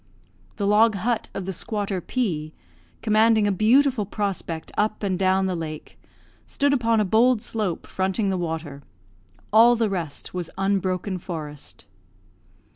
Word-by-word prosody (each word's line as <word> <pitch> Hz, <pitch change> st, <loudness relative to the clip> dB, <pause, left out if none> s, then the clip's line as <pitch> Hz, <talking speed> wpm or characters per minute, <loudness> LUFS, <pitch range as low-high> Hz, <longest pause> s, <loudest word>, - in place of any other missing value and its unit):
The 205 Hz, -, -2 dB
log 215 Hz, +2 st, +4 dB
hut 225 Hz, +4 st, -1 dB
of 195 Hz, -, -4 dB
the 190 Hz, -, -3 dB
squatter 200 Hz, -1 st, -3 dB
P, 160 Hz, -10 st, -2 dB, 0.5 s
commanding 220 Hz, 0 st, +4 dB
a 205 Hz, -, +2 dB
beautiful 245 Hz, +4 st, +3 dB
prospect 195 Hz, -6 st, -3 dB
up 215 Hz, +1 st, 0 dB
and 185 Hz, -2 st, -1 dB
down 190 Hz, 0 st, +2 dB
the 185 Hz, -1 st, -1 dB
lake, 155 Hz, -2 st, -7 dB, 0.5 s
stood 280 Hz, 0 st, +1 dB
upon 230 Hz, -4 st, +2 dB
a 210 Hz, -, +2 dB
bold 230 Hz, +5 st, +4 dB
slope 210 Hz, -7 st, -3 dB
fronting 190 Hz, +2 st, -1 dB
the -, -, 0 dB
water; 160 Hz, -4 st, -4 dB, 0.7 s
all 235 Hz, +2 st, +7 dB
the 225 Hz, -3 st, 0 dB
rest 170 Hz, -6 st, -4 dB
was 180 Hz, -2 st, -4 dB
unbroken 190 Hz, -1 st, -1 dB
forest. 155 Hz, -5 st, -7 dB
195 Hz, 140 wpm, -24 LUFS, 180-220 Hz, 0.7 s, all